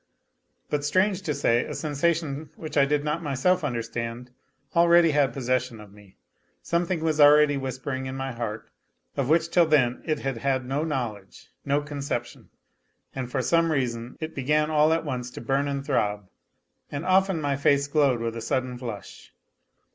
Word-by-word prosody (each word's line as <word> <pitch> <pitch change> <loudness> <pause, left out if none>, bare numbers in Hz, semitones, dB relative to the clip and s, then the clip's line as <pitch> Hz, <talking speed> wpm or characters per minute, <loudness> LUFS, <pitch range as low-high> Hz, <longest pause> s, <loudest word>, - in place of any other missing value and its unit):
But 145 -1 0
strange 185 +5 +1
to 165 -6 -2
say, 120 +1 +2
a - - -6
sensa 155 +2 0
tion 155 -2 -5
which 155 -2 -8
I 140 -2 +5
did 145 +1 0
not 150 +2 -1
myself 165 +5 +1
understand 120 -1 -4 0.4
already 170 -1 +5
had 145 -2 +2
possession 125 -3 -2
of 105 -2 -13
me; 105 -2 -18 0.5
something 170 0 -1
was 155 -2 +1
already 145 0 +7
whispering 130 0 -4
in 130 - -5
my 135 0 -3
heart, 115 -2 -5 0.4
of 140 -2 -1
which 165 +1 +3
till 175 -2 +4
then 130 -6 +2
it 155 -2 -1
had 135 -3 -2
had 130 +1 -1
no 135 +4 -1
knowledge, 120 - -5
no 140 +1 +1
conception, 145 -1 -5 0.6
and 130 -2 -4
for 130 -1 -1
some 165 +4 +2
reason 120 -4 -2
it 160 0 -5
began 150 +3 +1
all 155 0 +4
at 165 0 0
once 125 -1 -3
to - - -9
burn 135 +4 0
and 140 -1 -3
throb, 105 -8 -1 0.6
and 145 +3 -4
often 190 -1 +3
my 145 -2 0
face 140 0 +2
glowed 140 -5 +2
with 115 0 -3
a 115 - -5
sudden 125 +1 -2
flush. 115 -6 -8
140 Hz, 175 wpm, -26 LUFS, 125-155 Hz, 0.6 s, already